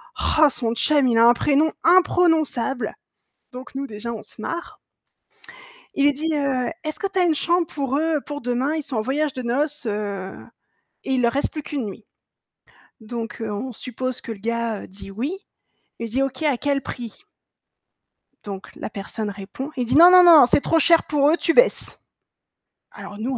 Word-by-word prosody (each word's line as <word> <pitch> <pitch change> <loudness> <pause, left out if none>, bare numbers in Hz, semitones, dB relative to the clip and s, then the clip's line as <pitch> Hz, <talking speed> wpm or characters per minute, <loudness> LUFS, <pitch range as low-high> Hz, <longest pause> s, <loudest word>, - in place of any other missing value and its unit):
roh 310 -2 +3
son 235 -3 -2
chum, 285 +2 +2
il 230 -2 +2
a 230 - +6
un 240 - +7
prénom 295 +5 +2
imprononçable» 325 -8 +2 0.6
donc 255 +1 -10
nous 275 +1 -3
déjà 225 0 -6
on 220 -2 -7
se - - -12
marre. 340 +9 -6 1.2
Il 280 - +1
lui 290 - +4
dit: 315 +3 -2
«Heu, 275 -1 -1
est-ce 310 -1 -5
que 395 - -1
tu 380 - -1
as 360 - +4
1 335 - +3
chambre 345 +1 +1
pour 275 -2 -2
eux, 315 0 +1
pour 290 -1 -6
demain, 250 +5 -1
ils 310 - -3
sont 265 -4 -4
en - - +1
voyage 280 +5 -1
de 255 - -5
noces, 285 +4 -1
heu, 205 -3 -4 0.7
et 265 - -1
il 255 - +1
leur 235 -1 +2
reste 280 - -1
plus 305 -2 -6
qu'1 280 -7 -4
nuit». 205 +1 -9 0.9
Donc 225 +1 -7
heu, 220 - -3
on 245 +6 -5
suppose 255 +2 -5
que 230 - -6
le 205 - -14
gars, 230 -1 -2
heu, - - -11
dit 195 +1 -12
«oui», 275 - -4 0.6
il 230 -1 -4
dit: 260 +5 -1
«OK 265 +1 -4
à 290 -5 +2
quel 280 +1 -1
prix?» 245 - -8 1.2
Donc 195 -1 -7
la - - -7
personne 205 +1 -5
répond, 200 +9 -8
il 250 -2 -1
dit: 255 - 0
«Non, 345 +2 +9
non, 365 0 +8
non, 325 -7 +9
c'est 265 - +2
trop 325 - +1
cher 335 +1 +4
pour 290 -1 +2
eux, 335 - +2
tu 330 - 0
baisses» - - +2 1.0
alors 205 - -9
nous 245 +4 -3
265 Hz, 195 wpm, -22 LUFS, 230-305 Hz, 1.2 s, Non